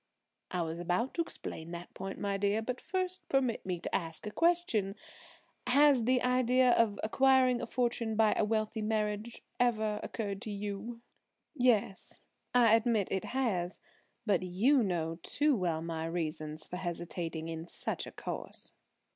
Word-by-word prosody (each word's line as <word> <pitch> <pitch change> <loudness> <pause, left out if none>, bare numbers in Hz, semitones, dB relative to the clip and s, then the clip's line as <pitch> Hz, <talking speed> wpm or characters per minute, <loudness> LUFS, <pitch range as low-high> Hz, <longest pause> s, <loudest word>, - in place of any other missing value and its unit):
"I 180 -2 -1
was 165 +1 -4
about 180 +9 0
to 340 - 0
explain 165 - -5
that 170 +1 -8
point, 195 +1 -6
my 200 -1 -1
dear; 200 +2 +1
but 250 +2 -4
first 370 -1 -3
permit 260 -4 +1
me 180 -2 -1
to - - -2
ask 165 -1 -3
a 210 - -4
question,–has 275 - +1
the 250 0 +3
idea 250 0 +4
of 225 -4 +3
acquiring 255 +1 +4
a - - -4
fortune 235 -2 0
by 220 -1 +4
a - - +2
wealthy 215 +1 0
marriage 215 +1 -2 0.2
ever 220 -3 +1
occurred 200 -3 -4
to 220 - -6
you?" 205 +3 -5 0.5
"Yes, 240 -8 +1 0.3
I 240 -3 +5
admit 225 -3 +1
it 190 - -1
has. 200 -9 -1 0.5
But 200 -5 +2
you 210 +10 +3
know 170 -5 -1
too 295 - +1
well 170 -6 -1
my 165 -1 -3
reasons 155 -2 -3
for 180 - -6
hesitating 170 -2 -4
in 165 0 -5
such - - -3
a - - -8
course." - - -6
215 Hz, 155 wpm, -32 LUFS, 180-245 Hz, 0.5 s, I